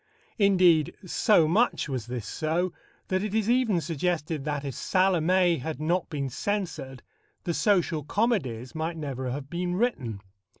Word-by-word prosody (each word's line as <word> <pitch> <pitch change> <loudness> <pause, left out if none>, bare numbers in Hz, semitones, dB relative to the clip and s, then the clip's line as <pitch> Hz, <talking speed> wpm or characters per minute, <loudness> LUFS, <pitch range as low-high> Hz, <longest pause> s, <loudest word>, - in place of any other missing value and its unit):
Indeed, 180 -6 +4
so 180 -2 +3
much 215 +5 +2
was 130 -5 -4
this 120 -3 -4
so, 165 - -1 0.4
that 185 0 +1
it 210 0 -3
is 220 -2 +1
even 240 -7 +2
suggested 160 -1 -2
that, 145 -2 -2
if 135 - -3
Salomé 180 -1 +2
had 155 0 -4
not 170 +4 0
been 140 -3 -2
censored, 155 - -3 0.4
the 170 - -1
social 175 -6 +1
comedies 150 - -1
might 160 +1 -3
never 135 -4 -4
have 135 +2 -5
been 175 +3 -2
written. 140 - -1
165 Hz, 145 wpm, -27 LUFS, 140-185 Hz, 0.4 s, Indeed